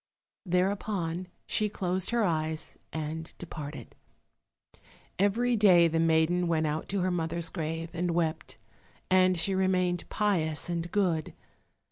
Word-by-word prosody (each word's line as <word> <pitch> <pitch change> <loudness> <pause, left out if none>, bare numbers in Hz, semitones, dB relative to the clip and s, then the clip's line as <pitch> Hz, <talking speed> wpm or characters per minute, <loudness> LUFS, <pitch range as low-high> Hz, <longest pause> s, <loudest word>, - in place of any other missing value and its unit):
Thereupon 180 -1 0 0.2
she 210 -1 +1
closed 185 -2 -2
her 235 -1 +2
eyes 160 -3 -1 0.2
and 160 +1 -4
departed. 150 -7 -8 1.3
Every 235 +5 +2
day 185 -6 +6
the 165 0 0
maiden 165 +2 +3
went 160 -1 +1
out 155 +1 -2
to 195 0 0
her 185 0 +1
mother's 165 -1 -2
grave, 165 -1 -4
and 175 +1 -1
wept, 165 -1 -1 0.5
and 185 -1 +5
she 190 +4 +1
remained 185 -2 +1
pious 175 -8 0
and 170 0 -3
good. 175 -7 0
175 Hz, 125 wpm, -29 LUFS, 160-185 Hz, 1.3 s, day